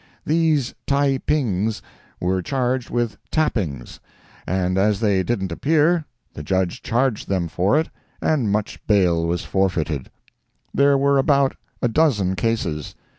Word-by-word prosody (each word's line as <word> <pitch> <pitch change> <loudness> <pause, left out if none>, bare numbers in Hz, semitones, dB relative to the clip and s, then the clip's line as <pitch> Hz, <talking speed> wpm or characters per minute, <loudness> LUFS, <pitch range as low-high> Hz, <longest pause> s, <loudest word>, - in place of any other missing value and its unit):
These 155 -4 +1
Taepings 135 -7 0 0.4
were 95 +1 0
charged 130 +2 -1
with 120 -2 -2
tappings, 95 - -2 0.5
and 90 +2 0
as 100 +1 +2
they 100 -4 +2
didn't 95 -3 -2
appear, 155 - +2 0.3
the - - -7
Judge 95 +3 -1
charged 120 -1 0
them 95 -3 0
for 95 - +2
it, 160 - -2 0.3
and 135 -10 +1
much 105 0 -2
bail 90 -6 +3
was 85 0 -2
forfeited. 85 -7 -1 0.6
There 140 0 +4
were 140 0 +3
about 140 -1 +3 0.3
a - - +4
dozen 115 - +2
cases. 90 -7 -2
110 Hz, 125 wpm, -22 LUFS, 95-140 Hz, 0.6 s, There